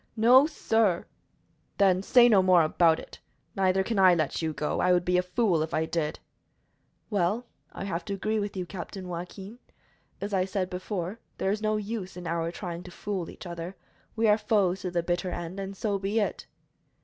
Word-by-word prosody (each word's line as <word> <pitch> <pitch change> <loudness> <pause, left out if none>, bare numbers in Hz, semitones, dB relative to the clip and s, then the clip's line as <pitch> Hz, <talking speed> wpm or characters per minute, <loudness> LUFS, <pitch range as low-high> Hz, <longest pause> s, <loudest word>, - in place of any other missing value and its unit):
"No, 250 +6 +7
sir!" 225 - +1 0.7
"Then 190 -2 +4
say 240 +4 +6
no 210 -5 +6
more 185 -2 +5
about 160 +1 +3
it. - - -12 0.4
Neither 190 0 +2
can 215 +1 -1
I 185 -2 +7
let 155 -1 -1
you 160 -1 -1
go. 150 0 -2
I 180 - +3
would 175 -1 +3
be 180 - +1
a - - +3
fool 180 -2 +1
if 160 +1 -2
I 160 +1 +1
did." 160 -2 -2 0.9
"Well, 205 +4 0 0.3
I - - -7
have 175 -3 -3
to 200 - -3
agree 215 +3 -1
with 205 -1 -4
you, 180 - -2
Captain 185 +1 -7
Joaquin. 190 +6 -7 0.6
As 205 +1 -4
I 185 -1 +3
said 190 -1 -2
before, 185 +2 -4 0.2
there 190 - 0
is 210 +1 -2
no 215 0 +1
use 205 -3 -5
in 180 - -8
our 165 0 -1
trying 175 -1 -6
to 180 - -11
fool 185 -1 -4
each - - -11
other. 170 +1 -6 0.4
We 225 0 +2
are 210 +1 +4
foes 200 -4 +1
to 185 - -3
the 175 -1 -1
bitter 175 +1 -1
end, 175 +2 -5
and 195 0 -6
so 205 -2 -1
be 200 +3 0
it." 205 - -2
185 Hz, 200 wpm, -28 LUFS, 175-205 Hz, 0.9 s, No